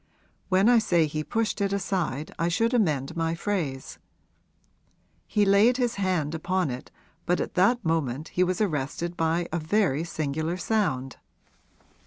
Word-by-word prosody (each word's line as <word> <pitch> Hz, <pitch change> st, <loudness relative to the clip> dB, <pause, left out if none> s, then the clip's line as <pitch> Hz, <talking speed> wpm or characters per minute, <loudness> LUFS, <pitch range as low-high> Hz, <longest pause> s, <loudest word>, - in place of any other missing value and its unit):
When 190 Hz, +2 st, +4 dB
I 240 Hz, -1 st, +6 dB
say 175 Hz, -7 st, +2 dB
he 155 Hz, 0 st, -3 dB
pushed 225 Hz, +3 st, -1 dB
it 200 Hz, -1 st, +1 dB
aside 185 Hz, -7 st, -2 dB
I 165 Hz, -, +1 dB
should 225 Hz, +8 st, +1 dB
amend 160 Hz, -, +1 dB
my 165 Hz, 0 st, -1 dB
phrase; 165 Hz, -9 st, -3 dB, 1.3 s
he 210 Hz, -1 st, +2 dB
laid 205 Hz, +5 st, +5 dB
his 245 Hz, -2 st, 0 dB
hand 175 Hz, -6 st, 0 dB
upon 175 Hz, -1 st, -1 dB
it, 125 Hz, +1 st, -7 dB, 0.4 s
but 180 Hz, +1 st, +2 dB
at -, -, -3 dB
that 205 Hz, +4 st, +2 dB
moment 155 Hz, -3 st, -1 dB
he 180 Hz, -, +1 dB
was 185 Hz, 0 st, -1 dB
arrested 170 Hz, -2 st, -2 dB
by 165 Hz, +1 st, 0 dB
a 170 Hz, -, -1 dB
very 165 Hz, -3 st, +1 dB
singular 160 Hz, +1 st, -2 dB
sound. 175 Hz, -, -1 dB
175 Hz, 150 wpm, -26 LUFS, 155-200 Hz, 1.3 s, I